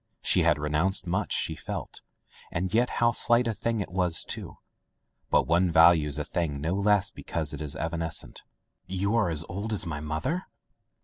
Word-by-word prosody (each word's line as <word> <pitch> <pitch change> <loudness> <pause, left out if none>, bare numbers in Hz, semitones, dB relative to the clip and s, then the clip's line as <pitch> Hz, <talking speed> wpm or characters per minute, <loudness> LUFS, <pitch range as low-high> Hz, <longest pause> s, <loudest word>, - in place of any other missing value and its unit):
She - - +4
had - - +3
renounced 75 +6 0
much, 90 0 -2
she - - 0
felt - - -7 0.2
— - - -24
and 90 +2 -2
yet 120 +2 +3
how 120 0 +2
slight 120 +1 +4
a 115 - 0
thing 115 +1 -2
it 95 - -6
was, 90 -3 +1
too! - - -6 0.7
But - - +3
one 85 +2 +2
values 80 -3 +5
a - - -1
thing 75 -5 -2
no 80 +5 -1
less 100 0 +2
because 80 -3 -4
it 75 - -6
is 75 0 -4
evanescent. 80 -6 -3 0.5
"You 100 +2 0
as 80 -3 0
old 100 +5 -4
as 100 - 0
my 75 -3 -4
mother!' 80 - -3
90 Hz, 180 wpm, -27 LUFS, 80-105 Hz, 0.7 s, values